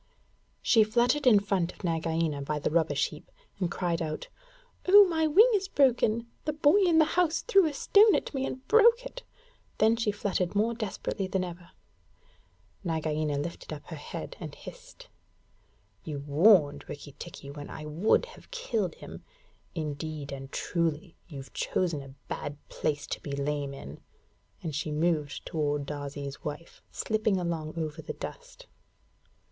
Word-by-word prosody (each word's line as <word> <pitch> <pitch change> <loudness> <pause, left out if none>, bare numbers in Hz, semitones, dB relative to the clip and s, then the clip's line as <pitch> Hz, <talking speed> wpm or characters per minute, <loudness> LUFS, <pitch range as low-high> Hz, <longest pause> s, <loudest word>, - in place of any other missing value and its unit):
She 225 -3 +6
fluttered 245 +6 +2
in 215 -5 +8
front 195 -3 0
of - - -17
Nagaina 165 -3 0
by 150 +2 -2
the 150 - -1
rubbish 155 -3 +2
heap, 150 - -13 0.3
and 180 -3 0
cried 175 -1 -1
out, 155 -1 -4 0.6
'Oh, 405 +2 +9
my 320 -3 +1
wing 430 +11 +6
is 390 -2 +1
broken! 240 - +2 0.2
The 305 - 0
boy 300 +4 +4
in 350 -5 +4
the 315 - +7
house 335 0 +1
threw 395 -8 +4
a 300 - -3
stone 415 +8 +6
at - - -2
me 270 -1 -1
and 260 +1 -7
broke 465 +2 +5
it.' - - -7 0.6
Then 220 +1 +4
she 225 -2 0
fluttered 200 -3 -2
more 220 +3 +2
desperately 205 -3 -3
than 185 0 -1
ever. 175 -1 -8 1.1
Nagaina 155 -3 -1
lifted 160 +4 -5
up 150 -2 -7
her 165 - -5
head 145 - -7
and - - -7
hissed, - - -12 1.0
'You 150 -2 -5
warned 150 -1 +5
Rikki 145 0 -8
tikki 140 - -8
when 145 0 -8
I 155 - -7
would 165 - +2
have - - -15
killed 230 - -2
him. - - -10 0.5
Indeed 150 -1 -4
and 135 0 -7
truly, 165 0 -2
you've 140 -6 -9
chosen 170 -6 -1
a 135 -1 -12
bad 145 0 -5
place 145 -2 -2
to - - -5
be 140 - -6
lame 140 0 -2
in.' 70 - -10 0.6
And 160 -3 -3
she 155 +2 -2
moved 150 -2 0
toward 145 -2 -1
Darzee's 145 -1 -6
wife, 150 +3 -7
slipping 215 -2 0
along 165 -3 -3
over 160 0 -3
the 155 - -6
dust. - - -9
170 Hz, 160 wpm, -29 LUFS, 150-235 Hz, 1.1 s, Oh